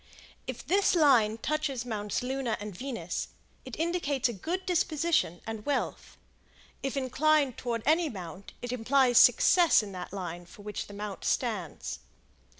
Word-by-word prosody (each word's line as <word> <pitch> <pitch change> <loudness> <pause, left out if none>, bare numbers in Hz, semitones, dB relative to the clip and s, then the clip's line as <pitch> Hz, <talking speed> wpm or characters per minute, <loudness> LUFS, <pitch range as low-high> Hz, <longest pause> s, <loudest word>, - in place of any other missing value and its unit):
If - - -6
this 390 +1 +3
line 245 -9 +4
touches 280 -2 -2
Mounts 210 -2 -3
Luna 255 -3 -2
and 205 -2 -7
Venus, 230 -7 -4 0.4
it - - -7
indicates 320 -6 0
a 240 - -4
good 345 - -4
disposition 320 - +1
and 225 -1 -5
wealth; 290 +3 -3 0.6
if 270 +1 -3
inclined 275 +1 +2
toward 230 -2 -3
any 320 +2 +3
mount, 185 - -9
it 245 - -3
implies 250 +1 +4
success 345 - +6
in 205 - -7
that 180 -1 -7
line 175 -3 -6
for 205 - -14
which 210 0 -5
the 205 - -11
mount 205 -1 -6
stands. 210 - -2
245 Hz, 150 wpm, -29 LUFS, 205-295 Hz, 0.6 s, success